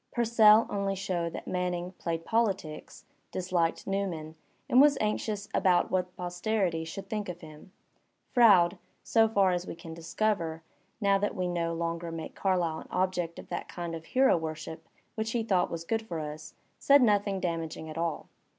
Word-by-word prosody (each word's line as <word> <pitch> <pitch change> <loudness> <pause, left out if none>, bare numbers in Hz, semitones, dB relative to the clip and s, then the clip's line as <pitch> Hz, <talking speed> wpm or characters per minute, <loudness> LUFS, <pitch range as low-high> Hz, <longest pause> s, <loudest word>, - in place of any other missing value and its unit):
Pureell 225 -2 +6
only 200 -1 -1
showed 180 -3 -2
that - - -6
Manning 180 -1 -2
played 165 -1 -3
politics^ 195 -9 -1 0.3
disliked 175 -2 -1
Newman, 180 -6 -3 0.3
and 255 - +6
was 290 0 +5
anxious 210 -1 -2
about 180 -2 +3
what 180 -1 -1
posterity 180 -1 -1
should 190 +4 -7
think 210 -2 -3
of 175 -1 -7
him. 155 +2 -13 0.6
Froude, 200 -8 +5 0.2
so 225 -1 +4
far 200 -4 +3
as 180 0 -2
we - - -5
can 165 -1 -9
discover, 165 -1 -2 0.4
now 200 -2 +3
that 205 - -1
we 185 -2 -1
no 170 -1 -1
longer 170 0 -3
make 165 -1 -6
Carlyle 175 -5 0
an - - -11
object 180 -3 -1
of - - -10
that - - -4
kind 170 -1 -5
of 160 -1 -7
hero 265 +7 +4
worship 160 0 -6 0.2
which 220 0 -3
he 235 -2 0
thought 190 -5 +1
was 165 -1 -5
good 225 +6 -1
for 180 -7 -6
us, 155 0 -7 0.2
said 280 -1 +6
nothing 205 -3 +2
damaging 165 -3 -3
at 155 - -8
all. 165 -1 -2
180 Hz, 170 wpm, -29 LUFS, 165-205 Hz, 0.6 s, Pureell